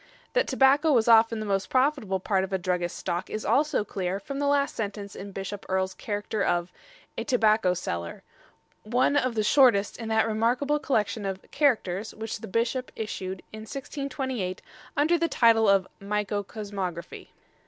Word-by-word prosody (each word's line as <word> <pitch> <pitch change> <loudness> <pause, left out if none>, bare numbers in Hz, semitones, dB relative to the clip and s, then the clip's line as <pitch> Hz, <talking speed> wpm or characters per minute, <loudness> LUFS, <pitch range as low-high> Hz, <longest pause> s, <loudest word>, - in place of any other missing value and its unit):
That - - +2
tobacco 280 +4 +4
was 235 -5 +3
often 225 0 +5
the 215 - -4
most 195 -2 -1
profitable 255 -8 +1
part 190 0 +1
of 190 - -5
a 190 - +1
druggist's 180 -1 -2
stock 175 0 -3
is 215 - -4
also 295 -5 +2
clear 190 -1 -3
from 275 +7 -6
the 285 - 0
last 280 0 +2
sentence 200 -2 -5
in 200 +1 -8
Bishop 195 +1 -6
Earle's 190 0 0
character 205 +1 -3
of 175 0 0 0.5
"A - - -2
Tobacco 215 -7 +3
Seller," 85 - -5 0.6
one 245 +6 +1
of 255 -4 +1
the 215 - +1
shortest 220 -4 +4
in 230 -2 -6
that 220 0 +3
remarkable 245 +7 +1
collection 220 -6 0
of 195 -1 -4
"Characters" 220 -8 +1
which 220 0 -5
the 225 - -8
Bishop 235 +5 -1
issued 190 -4 -5
in 215 - -7
1628 260 -5 -4 0.3
under 320 +4 +3
the 335 - +2
title 225 -5 +4
of 195 -1 +4
"Micro 205 0 -1
Cosmographie." 195 -5 -6
215 Hz, 165 wpm, -27 LUFS, 195-255 Hz, 0.6 s, often